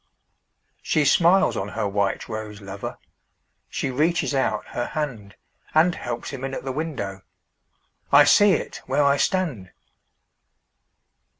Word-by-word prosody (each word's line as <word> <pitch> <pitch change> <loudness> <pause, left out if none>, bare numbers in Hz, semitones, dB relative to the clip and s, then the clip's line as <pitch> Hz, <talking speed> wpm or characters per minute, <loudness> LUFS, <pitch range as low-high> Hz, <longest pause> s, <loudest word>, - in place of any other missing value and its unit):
She 155 - +1
smiles 175 +6 +4
on 95 - -3
her 105 0 -2
white 100 -1 -1
rose 110 -2 -6
lover, 100 -1 -7 0.7
She 135 - -2
reaches 155 +4 +1
out 110 -6 0
her 120 - -3
handAnd 150 - -2
helps 120 -6 -5
him 135 -2 -7
in 135 0 -3
at - - -6
the 135 - -3
window—I 140 +1 -2
see 200 +7 +6
it - - -3
where 140 +3 +2
I 140 0 +3
stand! 140 - -1
135 Hz, 120 wpm, -23 LUFS, 105-155 Hz, 0.7 s, see